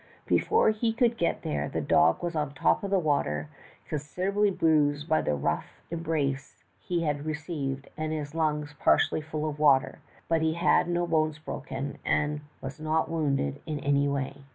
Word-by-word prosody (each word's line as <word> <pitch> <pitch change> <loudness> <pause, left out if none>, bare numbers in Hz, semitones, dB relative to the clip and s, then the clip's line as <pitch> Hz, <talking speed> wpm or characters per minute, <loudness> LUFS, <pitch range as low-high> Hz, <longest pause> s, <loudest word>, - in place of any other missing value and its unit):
Before 435 - +3
he 225 +1 0
could 235 0 +2
get 170 -7 -1
there, 75 0 -2
the - - -2
dog 80 - +3
was 175 -1 -2
on 150 -1 0
the 140 - -17
top 85 -9 +2
of 200 - -2
the 195 - +3
water, 110 - 0 0.4
con 150 - -2
siderably 195 +8 0
bruised 150 -2 +2
by 155 -1 +3
the 75 - 0
rough 70 - -3
embrace 150 -5 -2 0.2
he 175 -2 -2
had 150 -1 -2
received, 150 -4 -3
and 155 0 -3
his 150 -2 -4
lungs 150 -2 -1
partly - - +3
full 155 0 -3
of 150 -1 -5
water, 140 -3 +4 0.3
but 165 -1 +2
he 160 0 +2
had 170 0 +3
no 175 0 +1
bones 155 -2 +1
broken, 140 -2 -6
and 150 0 0 0.2
was 135 +3 -7
not 155 +1 0
wounded 140 - 0
in 150 -2 -2
any 140 0 +2
way. 140 0 -3
150 Hz, 180 wpm, -28 LUFS, 140-165 Hz, 0.4 s, water